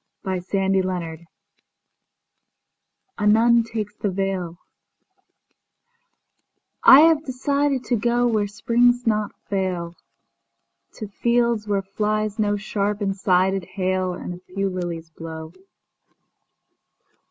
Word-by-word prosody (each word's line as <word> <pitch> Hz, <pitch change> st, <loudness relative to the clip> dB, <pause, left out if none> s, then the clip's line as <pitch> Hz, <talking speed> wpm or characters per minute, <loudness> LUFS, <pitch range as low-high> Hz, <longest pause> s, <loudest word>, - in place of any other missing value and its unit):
Heaven—Haven 185 Hz, -3 st, -2 dB, 1.9 s
A 210 Hz, -, +1 dB
nun 230 Hz, +2 st, +5 dB
takes 215 Hz, -2 st, -5 dB
the 210 Hz, -, -3 dB
veilI 190 Hz, -3 st, -3 dB, 2.3 s
HAVE 310 Hz, +2 st, +7 dB
desired 280 Hz, 0 st, -1 dB
to 245 Hz, -, 0 dB
goWhere 235 Hz, -2 st, +1 dB
springs 240 Hz, +3 st, +2 dB
not 215 Hz, -2 st, 0 dB, 0.2 s
fail, 185 Hz, -4 st, -2 dB, 1.0 s
To 215 Hz, -, -7 dB
fields 235 Hz, +1 st, 0 dB
where 200 Hz, -1 st, 0 dB
flies 215 Hz, +2 st, -2 dB
no 205 Hz, -1 st, +1 dB
sharp 205 Hz, 0 st, -2 dB
and 195 Hz, -1 st, -1 dB
sided 190 Hz, 0 st, +1 dB
hailAnd 185 Hz, -1 st, -2 dB
a 175 Hz, -, -10 dB
few 195 Hz, +2 st, -3 dB
lilies 170 Hz, -3 st, -5 dB
blow. 160 Hz, 0 st, -8 dB
200 Hz, 90 wpm, -22 LUFS, 185-230 Hz, 2.3 s, HAVE